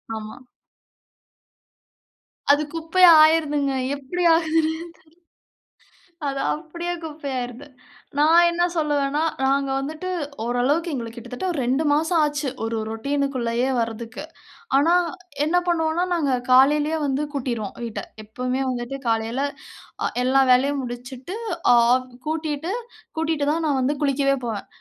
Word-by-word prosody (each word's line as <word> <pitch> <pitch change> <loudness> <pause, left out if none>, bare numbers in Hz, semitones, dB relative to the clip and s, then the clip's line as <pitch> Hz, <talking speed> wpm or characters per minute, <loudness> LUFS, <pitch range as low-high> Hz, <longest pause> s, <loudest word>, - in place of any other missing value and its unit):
ஆமா. 215 0 -7 2.1
அது 290 +1 +3
குப்பையா 335 +2 +5
ஆயிருதுங்க. 295 -3 +3 0.2
எப்டி 285 +6 -4
ஆகுதுனே 325 -1 +1 0.2
தெரியல்ல. 320 +2 -4 1.4
அது 275 0 -2
அப்டியே 340 +3 -5
குப்பையாயிறுது. 275 -4 -5 0.5
நான் 330 +4 +6
என்ன 340 0 0
சொல்லுவேன்னா, 295 -2 0 0.2
நாங்க 275 0 +1
வந்துட்டு 310 +6 -5 0.4
ஓரளவுக்கு 275 +8 0
எங்களுக்கு 235 -3 -5
கிட்டத்தட்ட 245 +7 -6
ஒரு 325 - -3
2 265 +5 +1
மாசம் 320 +3 +2
ஆச்சு. 295 -1 -2
ஒரு 225 0 -2
ரொட்டினுக்கு 275 +4 -2
உள்ளேயே 235 +2 0
வர்றதக்கு. 230 +2 -4 0.5
ஆனா 320 +5 +4 0.5
என்ன 320 +4 +1
பண்ணுவோம்னா 330 0 +1
நாங்க 295 -6 0 0.2
காலயிலேயே 295 +5 +4
வந்து 275 +2 0
கூட்டிருவோம் 240 -7 -3
வீட்ட. 230 -2 -5 0.2
எப்போமே 250 +4 -3
வந்துட்டு 250 +2 -4
காலையில 225 +3 0 0.8
எல்லா 270 +1 +4
வேலையும் 275 +2 +2
முடிச்சுட்டு, 250 - -7 0.4
ஆப் 250 +2 +3 0.2
கூட்டிட்டு 315 +1 -2 0.5
கூட்டிட்டு 320 -2 0
தான் 330 +1 -1
நான் 280 -3 +1
வந்து 280 +3 0
குளிக்கவே 275 -1 +2
போவேன். 220 -3 -4
280 Hz, 115 wpm, -23 LUFS, 250-315 Hz, 2.1 s, நான்